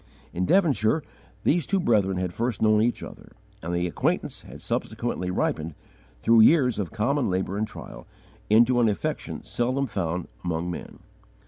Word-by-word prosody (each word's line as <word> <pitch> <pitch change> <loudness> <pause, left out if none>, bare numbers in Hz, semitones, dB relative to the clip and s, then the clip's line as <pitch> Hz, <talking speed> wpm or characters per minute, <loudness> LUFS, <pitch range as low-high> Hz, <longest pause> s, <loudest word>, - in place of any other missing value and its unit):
In 90 +1 -1
Devonshire 155 - +3 0.4
these 165 -1 +2
two 195 - +1
brethren 100 - +2
had 90 -1 -2
first 115 0 -2
known 110 -1 +4
each 120 +2 0
other, - - -11 0.3
and 85 - -4
the 85 0 0
acquaintance 85 - -1
had - - -12
subsequently 90 0 -3
ripened, 80 -3 -1 0.4
through 115 - +5
years 125 -2 +5
of 95 -5 -2
common 120 +5 0
labour 95 +1 -1
and 105 +1 -1
trial, - - -10 0.4
into 120 +3 +5
an 115 -2 +4
affection 100 - -3
seldom 130 +3 -1
found 90 -6 -3 0.2
among 85 0 -2
men. 85 - -8
110 Hz, 155 wpm, -25 LUFS, 90-125 Hz, 0.4 s, through